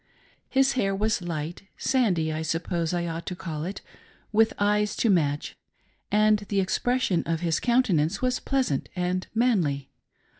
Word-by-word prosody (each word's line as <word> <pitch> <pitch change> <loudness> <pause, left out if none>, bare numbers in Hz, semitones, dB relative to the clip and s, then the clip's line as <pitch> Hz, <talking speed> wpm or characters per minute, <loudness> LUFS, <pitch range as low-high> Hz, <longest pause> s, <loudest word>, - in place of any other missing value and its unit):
His 270 0 +3
hair 195 -7 0
was 215 0 0
light, 165 -1 -4
— - - -43
sandy,' 185 - +1
t 155 - -3
suppose 165 +1 -1
I 175 -1 -1
ought 165 0 -5
to 180 - -3
call 160 -4 -5
it, 190 +3 -5 0.3
— - - -32
with 220 +1 +4
eyes 210 0 +1
to 225 - +2
match; 150 -5 0 0.6
and 215 0 +4
the 200 - +1
expression 200 0 +1
of 165 0 -1
his 165 -2 +1
counten 240 -9 +3
ance 165 +7 -1
was 255 0 0
pleasant 260 - -1
and 180 +1 -1
manly. 170 - +1
185 Hz, 165 wpm, -26 LUFS, 165-220 Hz, 0.6 s, with